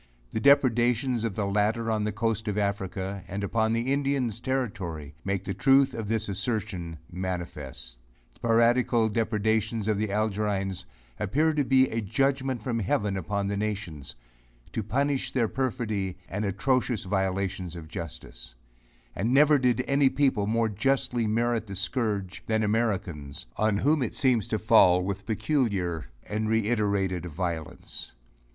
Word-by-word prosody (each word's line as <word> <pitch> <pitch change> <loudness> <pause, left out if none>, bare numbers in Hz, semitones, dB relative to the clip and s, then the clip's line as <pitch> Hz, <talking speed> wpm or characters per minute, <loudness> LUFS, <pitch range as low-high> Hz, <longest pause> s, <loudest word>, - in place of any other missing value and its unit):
The - - -1
depredations 125 -2 +3
of 115 -5 -2
the 105 - -1
latter 105 +3 +1
on 105 -1 0
the 105 - 0
coast 110 0 -1
of 105 -1 -1
Africa, 100 -1 -2
and 100 +2 -4
upon 110 +2 +1
the 120 +4 +1
Indians' 135 -5 0
Territory 95 - -3
make 100 0 -1
the 100 - -3
truth 135 +6 +4
of 110 -2 -4
this 110 0 0
assertion 100 -5 -3
manifest. 75 -9 -5 0.3
The - - -27
piratical 115 0 +3
depredations 110 0 0
of 105 -2 +1
the 110 -1 -1
Algerines 100 -3 -1 0.3
appear 150 +11 +2
to 150 -1 +1
be 130 0 +4
a 115 - -1
judgment 135 +2 0
from 115 -1 -1
heaven 100 0 0
upon 100 +2 -2
the 100 - -1
nations, 100 -9 -4 0.6
to - - -2
punish 130 +4 0
their 120 -4 +2
perfidy 110 -8 -2
and 105 +2 -3
atrocious 125 +3 0
violations 95 -2 -1
of 80 -2 -8
justice; - - -8 0.6
and 110 +5 0
never 145 +2 +6
did 125 0 +2
any 140 -1 +4
people 130 -8 +1
more 115 +1 +2
justly 120 +1 0
merit 115 0 0
the 100 - -6
scourge 100 -2 -1
than 110 -1 +1
Americans, 100 - -1
on 110 -1 +2
whom 150 +6 +2
it 120 - -2
seems 125 -6 +2
to 110 - 0
fall 95 -4 +5
with 100 +1 -4
peculiar 105 - 0 0.2
and 110 +1 -1
reiterated 100 -5 +1
violence. 85 -1 -5
110 Hz, 145 wpm, -27 LUFS, 95-120 Hz, 0.6 s, never